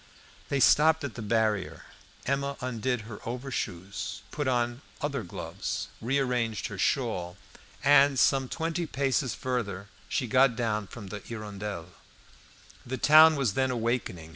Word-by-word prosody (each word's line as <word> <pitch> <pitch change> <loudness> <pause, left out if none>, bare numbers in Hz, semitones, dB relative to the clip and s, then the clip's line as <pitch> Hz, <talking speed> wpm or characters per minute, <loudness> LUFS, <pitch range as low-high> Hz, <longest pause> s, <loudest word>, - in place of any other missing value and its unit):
They 140 - +1
stopped 160 +3 +5
at 140 -5 -4
the 115 - -7
barrier; 110 -3 0 0.4
Emma 140 +1 -1
undid 125 -1 -2
her 110 -1 -9
overshoes, 100 -6 -4
put 145 -2 -2
on 120 0 0 0.2
other 140 -3 -2
gloves, 95 +2 -5
rearranged 125 -3 0
her 100 - -7
shawl, 100 -9 0 0.5
and 140 -1 +6
some 135 0 +3
twenty 165 +1 -2
paces 135 -2 0
farther 105 -6 -3 0.2
she 130 - 0
got 130 +1 +4
down 110 -4 -1
from 100 -3 -9
the 105 - -5
"Hirondelle." 105 -5 -6 0.9
The 130 +2 -4
town 155 +4 +8
was 135 -8 0
then 130 +3 +1
awakening. 115 -9 -2
120 Hz, 135 wpm, -28 LUFS, 105-135 Hz, 0.9 s, town